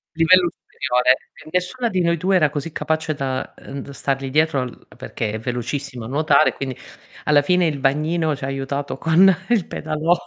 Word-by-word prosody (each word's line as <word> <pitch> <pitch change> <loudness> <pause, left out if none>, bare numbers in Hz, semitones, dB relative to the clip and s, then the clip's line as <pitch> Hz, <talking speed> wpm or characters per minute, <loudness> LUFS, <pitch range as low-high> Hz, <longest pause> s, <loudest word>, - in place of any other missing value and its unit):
Livello 175 +2 +5
superiore, 125 +1 +1 0.3
e - - -11
nessuna 180 +8 0
di 185 -5 0
noi 170 0 +2
2 190 +4 +1
era 155 -5 +4
così 150 +2 -5
capace 160 -1 -1
da, 135 -2 -3
ehm, 140 +1 -8
d - - -11
stargli 135 -1 -2
dietro 150 -2 +2
l 125 - -12
perché 110 -2 -4
è 110 - -4
velocissima 125 +2 -4
a - - -6
nuotare, 150 +1 +3
quindi 130 -2 -5 0.5
alla 145 -1 +5
fine 180 +4 +2
il 150 -3 -2
bagnino 155 +3 +1
ci 135 - -11
ha - - -1
aiutato 135 +1 -3
con 170 +6 +5 0.2
il 225 -7 +2
pedalò. 155 +2 0
150 Hz, 185 wpm, -21 LUFS, 135-165 Hz, 0.5 s, Livello